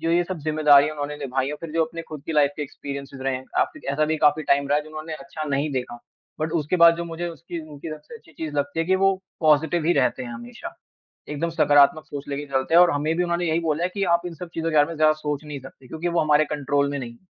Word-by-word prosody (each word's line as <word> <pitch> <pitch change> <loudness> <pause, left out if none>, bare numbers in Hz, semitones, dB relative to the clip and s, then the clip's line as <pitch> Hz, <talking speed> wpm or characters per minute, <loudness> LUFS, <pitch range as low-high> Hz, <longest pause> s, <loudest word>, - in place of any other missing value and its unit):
जो 165 +1 -1
ये 175 +1 +3
सब 185 0 -5
ज़िम्मेदारियाँ 150 -1 +4
उन्होंने 145 0 -4
निभाई 135 -2 -2
हैं, 150 - -3
फिर 165 - -7
जो 165 0 +2
अपने 165 +1 -7
खुद 150 -3 -8
की 165 - -2
लाइफ 145 -2 +4
के 150 - -3
एक्सपीरियंसेज़ 140 -1 -7
रहे 135 0 0
हैं, 130 - -9
आपकी - - -1
ऐसा 155 +2 +2
भी 160 - 0
काफ़ी 150 +1 +2
टाइम 140 -1 +2
रहा 145 +1 +3
जो 150 - -12
उन्होंने 155 +1 -6
अच्छा 155 +2 -7
नहीं 140 +2 0
देखा। 125 -2 -4 0.4
बट 155 +1 -1
उसके 150 +5 -1
बाद 170 0 +7
जो 170 - -4
मुझे 170 +1 -4
उसकी 170 0 -7
उनकी 150 +2 -8
सबसे 150 +7 -9
अच्छी 160 - -20
चीज़ 155 0 -6
लगती 145 +3 -1
है 165 - -1
कि 190 +1 +3
वो 195 0 +3 0.3
पॉजिटिव 155 +1 +3
ही 175 - +4
रहते 130 -2 +1
हैं 120 - -7
हमेशा। 120 +1 -9 0.5
एकदम 150 +3 -2
सकारात्मक 150 0 +4
सोच 145 -2 -7
लेके 145 +1 -3
चलते 135 +3 0
हैं 175 - +9
और 180 - +5
हमें 150 +3 0
भी 180 - +2
उन्होंने 175 0 -1
यही 160 +1 +2
बोला 160 0 -1
है 180 - +1
कि 200 - -1
आप 170 - -2
इन 175 - -5
सब 175 +1 -8
चीज़ों 165 0 -2
के 160 - -2
बारे 145 -1 +5
में 165 - -6
ज़्यादा 155 0 +4
सोच 150 -1 -4
नहीं 145 -2 -6
सकते 130 0 -14
क्योंकि 160 +5 -4
वो 170 0 +1
हमारे 150 0 +4
कंट्रोल 145 -1 0
में 145 - -2
नहीं। 120 -2 -7
155 Hz, 270 wpm, -24 LUFS, 140-165 Hz, 0.5 s, हैं